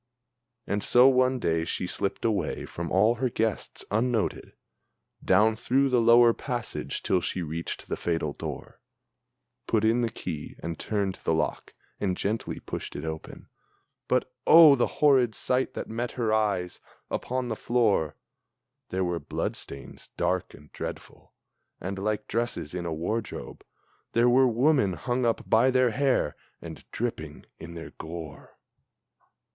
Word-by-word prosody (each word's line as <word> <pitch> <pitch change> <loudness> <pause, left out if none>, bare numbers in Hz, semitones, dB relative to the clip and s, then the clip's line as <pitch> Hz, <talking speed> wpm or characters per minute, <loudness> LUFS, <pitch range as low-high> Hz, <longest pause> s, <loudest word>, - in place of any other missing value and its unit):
And 105 0 -1
so 125 +4 +6
one 130 0 +3
day 80 -8 0
she 85 - -3
slipped 100 +4 -3
away 100 -8 -1
from 85 -1 -6
all 105 +5 +4
her 130 - +2
guests, 110 -2 -2
unnoted, 115 +1 0 0.7
Down 110 +1 +4
through 135 +4 +1
the 125 -2 +3
lower 115 0 +6
passage, 115 - -4
till 90 - +2
she 90 - -2
reached 80 +1 -5
the - - -2
fatal 80 -4 -2
door, - - -7 0.9
Put 110 -1 +2
in 115 +2 +3
the 115 - +1
key 85 -9 -6
and 85 0 -4
turned 100 -3 -2
the - - +1
lock, - - -2 0.2
and 95 -3 -1
gently 105 +2 -2
pushed - - -6
it 75 - -5
open 80 0 -7 0.6
But, 125 0 0
oh 160 -3 +10
the 125 -3 +2
horrid 130 -6 +3
sight 130 0 0
that - - -4
met 115 +2 -3
her 115 -3 0
eyes! 100 -5 0 0.3
Upon 130 0 -2
the 110 - -2
floor 105 - +1 0.7
There 95 0 -1
were 90 -1 -1
blood 70 - -3
stains 70 - -9
dark 90 -1 -1
and 75 0 -17
dreadful, - - -8 0.5
and 95 +2 -4
like 105 +1 -2
dresses 110 -9 -2
in 90 -1 -3
a - - -3
wardrobe, 105 +8 -4 0.5
There 120 +1 +4
were 130 +2 +5
women 125 -4 +3
hung 120 +6 -1
up 115 - -1
by 115 +4 +4
their 130 -2 +3
hair, 140 +1 +1 0.2
and 80 -5 -9
dripping 110 -11 -4
in 85 +1 -9
their 80 -1 -8
gore! 80 -1 -9
110 Hz, 150 wpm, -27 LUFS, 85-120 Hz, 0.9 s, oh